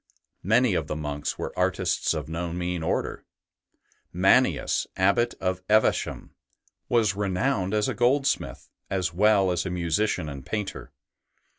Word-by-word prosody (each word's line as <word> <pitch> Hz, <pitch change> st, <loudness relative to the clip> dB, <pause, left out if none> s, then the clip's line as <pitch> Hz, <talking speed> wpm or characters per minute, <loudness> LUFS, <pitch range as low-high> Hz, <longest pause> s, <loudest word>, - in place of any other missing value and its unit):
Many 115 Hz, +3 st, +3 dB
of 80 Hz, -4 st, -1 dB
the 75 Hz, -, -3 dB
monks 75 Hz, -1 st, -4 dB
were -, -, -5 dB
artists -, -, 0 dB
of 75 Hz, -3 st, -4 dB
no 85 Hz, +2 st, -4 dB
mean 90 Hz, 0 st, -3 dB
order. 80 Hz, -, -2 dB, 0.9 s
Mannius, -, -, +2 dB
Abbot 100 Hz, +6 st, +2 dB
of 95 Hz, 0 st, -2 dB
Evesham, 110 Hz, +1 st, +1 dB, 0.6 s
was 115 Hz, -4 st, +3 dB
renowned 100 Hz, +1 st, 0 dB
as 105 Hz, -1 st, +1 dB
a -, -, -1 dB
goldsmith, 135 Hz, +3 st, 0 dB, 0.2 s
as 90 Hz, -3 st, -1 dB
well 100 Hz, 0 st, +4 dB
as 90 Hz, -1 st, 0 dB
a 95 Hz, -, -4 dB
musician 90 Hz, 0 st, -1 dB
and 70 Hz, -2 st, -7 dB
painter. 105 Hz, +4 st, -5 dB
95 Hz, 135 wpm, -26 LUFS, 85-110 Hz, 0.9 s, well